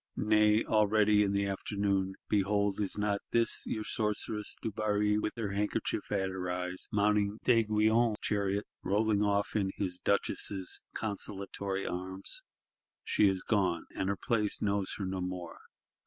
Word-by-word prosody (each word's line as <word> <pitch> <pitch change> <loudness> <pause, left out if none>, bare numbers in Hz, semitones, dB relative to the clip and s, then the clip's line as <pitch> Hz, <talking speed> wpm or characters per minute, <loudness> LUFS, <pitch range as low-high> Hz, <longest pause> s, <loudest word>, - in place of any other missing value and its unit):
Nay, 105 0 +4
already, 105 -1 +4
in 100 -1 +2
the 100 0 +1
afternoon, 100 -1 -1
behold 100 0 +1
is 100 - -2
not 105 -1 0
this 115 -1 +1
your 110 - -2
Sorceress 105 0 -2
Dubarry 105 -1 +1
with 105 - -2
the 105 -4 -3
handkerchief 105 +1 -2
at 95 -2 0
her 90 -1 -4
eyes, 90 +1 -3
mounting 105 0 +2
D'Aiguillon's 110 -1 +3
chariot; 100 0 0 0.2
rolling 105 +1 +2
off 100 -1 +1
in 100 -3 +1
his 90 -3 -2
Duchess's 100 -1 -1
consolatory 100 -2 -3
arms? 95 +2 -5 0.6
She 105 - +3
is 95 -1 -1
gone; 95 -6 +1
and 95 - -1
her 100 - 0
place 105 -2 0
knows 100 -2 0
her 100 - -3
no 95 0 -3
more. 90 -2 -5
100 Hz, 140 wpm, -31 LUFS, 95-105 Hz, 0.6 s, Nay